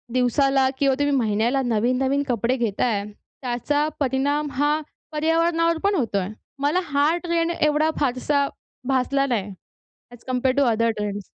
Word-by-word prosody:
दिवसाला 265 +2 +3
किंवा 275 -2 +2
तुम्ही 285 0 +1
महिन्याला 230 +3 +1
नवीन-नवीन 255 +4 +1
कपडे 240 +1 0
घेताय, 220 -2 0 0.4
त्याचा 280 +4 0
परिणाम 285 +2 0
हा 290 +3 +1 0.3
पर्यावरणावर 330 +2 +1
पण 400 0 +2
होतोय. 205 - 0 0.3
मला 290 +5 +2
हा 295 +2 +2
ट्रेंड 335 -1 0
एवढा 300 +1 +2
फारसा 280 +2 +1 0.4
भासला 275 +1 +1
नाही, 215 -7 -1 0.6
as 240 -1 -15
compared 255 +1 0
to 280 - +5
other 230 +1 +2
trends. 205 -1 -3
270 Hz, 130 wpm, -23 LUFS, 240-295 Hz, 0.6 s, to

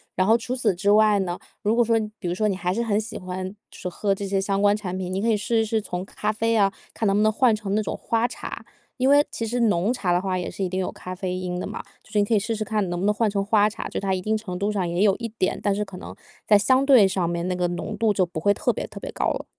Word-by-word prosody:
然 185 - +2
后 225 +3 +5
除 250 +2 -4
此 230 -6 +1
之 195 +3 +1
外 210 -1 +5
呢， 180 -2 -2 0.2
如 215 +2 +1
果 240 - +4
说 230 0 +2 0.2
比 180 - -4
如 - - 0
说 215 +4 0
你 195 - 0
还 180 0 -1
是 230 - -1
很 215 -3 +1
喜 220 - -7
欢 185 +1 -5 0.4
喝 200 +2 0
这 200 - -5
些 195 0 0
相 195 +1 0
关 205 0 +4
产 185 -3 -4
品， 185 -1 -4
你 190 - -1
可 225 - 0
以 225 - +4
试 225 +2 0
一 225 - +2
试 220 0 0
从 180 -1 -5
咖 210 +1 -2
啡 225 +1 0
啊， 200 -2 +4 0.2
看 220 - -2
能 195 - +3
不 - - +3
能 215 - +4
换 230 +2 +3
成 205 -2 -2
那 215 - +2
种 - - -4
花 230 0 0
茶。 - - -6 0.3
因 260 0 +2
为 290 +1 +6
其 230 - -4
实 240 +3 -2
浓 210 -3 +2
茶 195 -8 0
的 175 - +2
话 185 -1 -1
也 180 - -3
是 195 - -4
一 185 - -1
定 185 +1 -2
有 185 - -1
咖 185 - -8
啡 185 0 -3
因 180 -1 -3
的 - - -4
嘛， - - -6 0.2
就 - - -23
是 - - 0
你 - - +4
可 205 - -1
以 215 - +5
试 225 +3 -2
试 215 - -2
看 210 -3 -1
能 175 - -2
不 185 - -1
能 210 - +3
换 215 +1 +1
成 200 -1 -1
花 210 0 +4
茶， 215 - -6
就 - - -3
它 195 -1 -1
一 185 - -1
定 215 +3 0
程 185 -4 -6
度 200 +3 0
上 190 -4 -1
也 175 +3 0
有 200 -2 +4
一 235 - -4
点， 185 - 0
但 200 -1 +1
是 210 - -1
可 195 -2 -10
能 - - -9 0.3
在 210 - +7
相 260 +6 +3
对 255 -8 +7
上 185 -3 0
面 170 0 -2
那 - - 0
个 180 0 0
浓 175 0 -4
度 225 -2 +2
就 185 -2 +2
不 170 -2 -6
会 200 +5 +3
特 - - 0
别 - - -5
特 - - -13
别 - - -5
高 - - -2
了。 - - -5
205 Hz, 345 characters per minute, -24 LUFS, 185-220 Hz, 0.4 s, 在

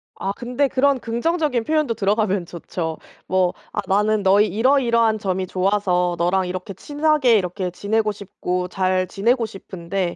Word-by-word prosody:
아 195 - -3
근데 245 +6 -1
그런 275 0 +2
긍정적인 255 +2 -1
표현도 305 -2 +1
들어가면 205 -3 0
좋죠. 165 -1 -5 0.3
뭐 185 -1 +2 0.2
"아 210 - -2
나는 210 +1 +2
너의 200 +3 +5
이러이러한 230 0 +2
점이 190 -2 -1
좋아서 185 -2 +1
너랑 180 +2 +1
이렇게 185 +2 -5
친하게 290 - +2
이렇게 180 0 -2
지내고 210 +4 0
싶고 180 -3 -4
잘 185 -1 0
지내고 230 +5 +1
싶은데 190 -2 -4
205 Hz, 335 characters per minute, -21 LUFS, 185-235 Hz, 0.3 s, 너의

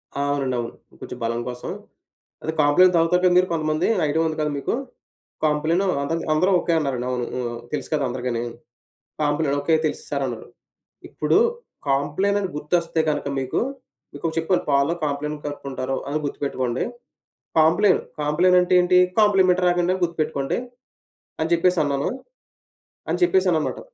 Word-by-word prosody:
ఆ! 140 - -1
అవునండి. 135 -3 -1
అవును. 115 -1 -4 0.3
కొంచెం - - -7
బలం 115 +1 -1
కోసం, 125 0 -6 0.7
అదె 160 - -1
కాంప్లాన్ 165 +6 +5
తాగుతారు 170 +2 +3
కదా! 180 -1 +5
మీరు 185 0 +4
కొంతమంది 155 +1 0 0.2
ఐడియా 155 +2 +1
ఉంది 155 - -3
కదా! 150 0 0
మీకు? 140 - -2 0.7
కంప్లాను 155 +5 +1 0.2
అందరి 165 +4 -2
అందరూ 180 +5 +3
ఓకే 175 - -1
అన్నారండి. 135 -5 -2
అవును. 125 -1 -1
హ్మ్. 120 -2 -3 0.2
తెలుసు 150 -3 -3
కదా! 145 -2 +1
అందరికిని. 120 -1 -3 0.8
Complan 145 -1 +1
"okay. 160 +3 +2
తెలుసు 155 - -3
సార్ - - -1
అన్నారు." - - -6 0.6
ఇప్పుడు - - +1 0.5
కాంప్లాన్ 150 +9 +1
అని 195 -2 -2
గుర్తొస్తే 165 +2 0
గనక 145 -1 -2
మీకు, 130 -1 -1 0.5
మీకొకటి 160 +3 -4
చెప్పాను 170 +3 +1
పాలు 140 +3 +3
కాంప్లాన్ 150 +1 -2
కలుపుకుంటారు 135 -2 -4
అని 145 - 0
గుర్తుపెట్టుకోండి. 130 -4 -2 0.8
కాంప్లెన్, 180 +5 +4 0.2
కాంప్లెన్ 170 +5 +3
అంటే 180 0 +1
ఏంటి? 180 0 +4 0.2
కాంప్లిమెంట్‌రాగా 185 -4 +4
అని 185 +1 +1
గుర్తుపెట్టుకోండి, 155 -5 -1 0.8
అని 160 +1 -1
జెప్పేసి 175 +1 +3
అన్నాను. 140 -1 0 1.0
అని - - 0
చెప్పేసానన్నమాట. 185 - +2
155 Hz, 140 wpm, -23 LUFS, 140-175 Hz, 1.0 s, కాంప్లాన్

